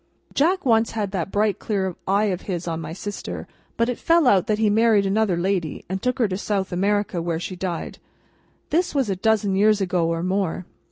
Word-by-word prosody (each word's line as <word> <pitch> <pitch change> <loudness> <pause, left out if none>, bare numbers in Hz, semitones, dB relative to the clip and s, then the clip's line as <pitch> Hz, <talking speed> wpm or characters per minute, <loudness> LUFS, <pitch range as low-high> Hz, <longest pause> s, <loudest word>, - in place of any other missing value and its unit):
Jack 345 +5 +2
once 225 -2 +3
had 210 -3 -2
that 185 -2 -2
bright 210 0 +1
clear 190 -4 -2
eye 200 +2 +3
of 180 - -5
his 175 -2 -3
on 165 -1 -2
my 155 0 -6
sister; 205 +4 -6 0.3
but, 230 - +2
it 245 - -3
fell 335 -2 +3
out 200 -5 +4
that 215 -2 +1
he 220 0 +2
married 215 -1 +4
another 195 -2 +1
lady 175 -3 -1
and 190 0 -3
took 250 0 0
her 235 -4 +2
to 185 -1 -3
South 195 -3 -2
America, 200 0 0
where 165 -1 -2
she 185 +2 -5
died. 175 -2 -4 0.7
This 345 0 +1
was 260 -7 +1
a - - 0
dozen 205 0 +1
years 210 +1 +4
ago 180 -3 +1
or 165 0 -1
more. 185 -1 -1
200 Hz, 210 wpm, -23 LUFS, 180-220 Hz, 0.7 s, out